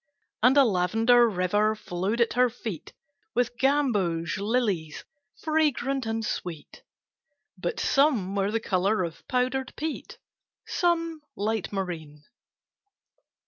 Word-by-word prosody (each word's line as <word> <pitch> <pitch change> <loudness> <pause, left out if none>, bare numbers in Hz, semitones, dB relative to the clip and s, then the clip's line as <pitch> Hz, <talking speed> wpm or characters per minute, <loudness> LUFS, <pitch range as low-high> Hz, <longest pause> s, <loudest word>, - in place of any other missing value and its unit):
And 250 +5 +5
a 280 - +8
lavender 225 +4 +4
river 205 +3 +1
flowed 200 +3 -2
at 235 - +2
her 250 0 +4
feet 220 -8 -7 0.4
With 245 0 +1
gamboge 200 - +1
lilies 200 -8 -1 0.3
fragrant 275 -5 0
and 225 0 -2
sweet, 170 -6 -6 0.7
But 175 -2 -3
some 260 -10 +2
were 200 0 0
the 225 +2 0
color 195 -1 +1
of 165 -2 -6
powdered 255 +1 -1
peat, 315 0 -5 0.5
Some 335 -2 0
light 215 0 -2
marine. 165 -7 -5
220 Hz, 110 wpm, -26 LUFS, 185-255 Hz, 0.7 s, a